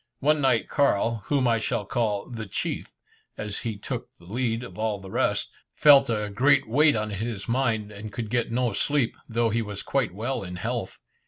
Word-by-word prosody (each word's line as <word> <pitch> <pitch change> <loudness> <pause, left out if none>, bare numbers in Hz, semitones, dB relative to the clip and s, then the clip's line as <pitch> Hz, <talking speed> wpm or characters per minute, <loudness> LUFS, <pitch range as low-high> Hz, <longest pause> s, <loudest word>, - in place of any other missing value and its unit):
One 150 +1 +3
night 130 -4 +2
Carl 115 -5 +2
whom 140 -3 +2
I 115 -1 +3
shall 105 -1 -1
call 105 -2 -1
"the 115 -4 -6
chief," - - -3 0.5
as 105 -1 -4
he 110 -3 -4
took 100 - -5
the 85 - -18
lead 115 +3 -1
of 125 - -10
all 110 -2 0
the 95 -1 -10
rest - - 0 0.2
felt 140 -3 +7
a 105 -2 -1
great 130 +5 +4
weight 145 +6 +4
on 110 -1 -2
his 105 0 -4
mind, 115 -4 0
and 105 +1 -8
could 110 0 -5
get 120 -2 0
no 120 -2 +1
sleep, 140 +2 +1
though 115 0 +1
he 115 +2 +1
was 105 -2 -5
quite 135 -7 0
well 120 +6 -3
in 90 -1 -6
health. 90 - -3
115 Hz, 195 wpm, -26 LUFS, 105-125 Hz, 0.5 s, felt